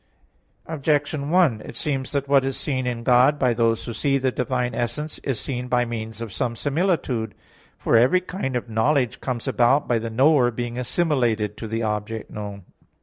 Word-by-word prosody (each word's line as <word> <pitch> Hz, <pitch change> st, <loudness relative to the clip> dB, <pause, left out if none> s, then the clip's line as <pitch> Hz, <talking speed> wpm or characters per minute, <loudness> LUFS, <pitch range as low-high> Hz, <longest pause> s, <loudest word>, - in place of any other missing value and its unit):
Objection 145 Hz, -1 st, -1 dB
1: 160 Hz, -11 st, +3 dB
It -, -, -9 dB
seems 135 Hz, -1 st, -2 dB
that 140 Hz, -1 st, -1 dB
what 140 Hz, -1 st, +4 dB
is 135 Hz, 0 st, -2 dB
seen 130 Hz, -3 st, -1 dB
in 120 Hz, -1 st, -3 dB
God 125 Hz, +4 st, +5 dB
by 125 Hz, -4 st, +2 dB
those 115 Hz, -1 st, +1 dB
who 120 Hz, -, -5 dB
see 140 Hz, +3 st, +1 dB
the 130 Hz, -1 st, 0 dB
Divine 125 Hz, 0 st, -1 dB
essence, 150 Hz, +6 st, -3 dB
is 130 Hz, -6 st, -2 dB
seen 125 Hz, -2 st, -4 dB
by 125 Hz, -1 st, +2 dB
means 115 Hz, -1 st, -6 dB
of 110 Hz, -4 st, -6 dB
some 120 Hz, 0 st, -2 dB
similitude. 140 Hz, -, -1 dB, 0.4 s
For -, -, +1 dB
every 130 Hz, +11 st, +5 dB
kind 180 Hz, -8 st, -4 dB
of 125 Hz, -, -2 dB
knowledge 120 Hz, +3 st, +1 dB
comes 125 Hz, -3 st, -3 dB
about 125 Hz, +4 st, +3 dB
by 120 Hz, -2 st, +2 dB
the 115 Hz, +1 st, -4 dB
knower 130 Hz, +2 st, +4 dB
being 120 Hz, +1 st, -4 dB
assimilated 120 Hz, -, 0 dB
to 115 Hz, -, -6 dB
the 115 Hz, +1 st, -2 dB
object 105 Hz, +1 st, -3 dB
known. 100 Hz, -2 st, -7 dB
125 Hz, 185 wpm, -23 LUFS, 115-140 Hz, 0.4 s, God